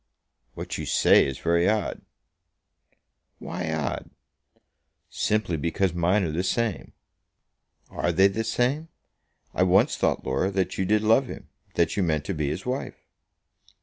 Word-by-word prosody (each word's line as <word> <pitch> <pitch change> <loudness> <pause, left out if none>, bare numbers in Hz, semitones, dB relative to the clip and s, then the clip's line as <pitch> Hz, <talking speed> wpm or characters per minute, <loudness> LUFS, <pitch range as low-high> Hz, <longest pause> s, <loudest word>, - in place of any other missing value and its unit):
"What - - -5
you - - -5
say - - +5
is 70 -1 -4
very 85 +3 +2
odd." 105 -1 -1 1.4
"Why 85 -1 -5
odd?" 80 -4 -3 1.0
"Simply 105 -6 0
because 85 +4 0
mine 90 +4 +2
are 80 - -1
the 85 +4 -1
same." 105 - -2 1.0
"Are 85 - -1
they 95 +3 +4
the 110 +3 -2
same? 130 +7 0 0.7
I - - -1
once 95 +1 +4
thought, - - 0
Laura, 65 +9 0
that 95 -2 -2
you 95 - +1
did 105 +3 +2
love 115 +5 +4
him; - - -9 0.3
that - - +1
you - - +2
meant 80 -4 0
to 100 - -2
be 75 -4 -1
his 85 +6 -5
wife." 130 +2 -3
95 Hz, 150 wpm, -25 LUFS, 85-105 Hz, 1.4 s, say